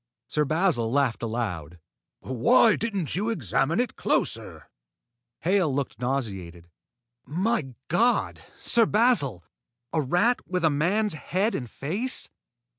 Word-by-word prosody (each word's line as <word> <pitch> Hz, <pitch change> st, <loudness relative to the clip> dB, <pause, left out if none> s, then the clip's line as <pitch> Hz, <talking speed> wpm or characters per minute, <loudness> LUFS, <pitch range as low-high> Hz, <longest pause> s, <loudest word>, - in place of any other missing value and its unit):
Sir 150 Hz, +4 st, 0 dB
Basil 155 Hz, -7 st, +1 dB
laughed 135 Hz, -3 st, +1 dB
aloud. 100 Hz, -9 st, -3 dB, 0.4 s
"Why 220 Hz, -, +4 dB
didn't 200 Hz, -, -2 dB
you 210 Hz, +5 st, 0 dB
examine 135 Hz, -, 0 dB
it 245 Hz, -2 st, -1 dB
closer?" -, -, -2 dB, 0.7 s
Hale 180 Hz, -2 st, +2 dB
looked 135 Hz, -5 st, -3 dB
nauseated. 95 Hz, -10 st, -3 dB, 0.6 s
"My 165 Hz, -, -1 dB
God, 235 Hz, +9 st, +1 dB, 0.2 s
Sir 230 Hz, -2 st, +3 dB
Basil! 200 Hz, -, +2 dB, 0.5 s
A 160 Hz, -, +2 dB
rat 180 Hz, -, +2 dB
with 180 Hz, -1 st, -2 dB
a 160 Hz, -, +4 dB
man's 185 Hz, +8 st, +1 dB
head 190 Hz, +8 st, -1 dB
and 125 Hz, -3 st, -4 dB
face!" 200 Hz, -, -3 dB
155 Hz, 115 wpm, -26 LUFS, 125-205 Hz, 0.7 s, Why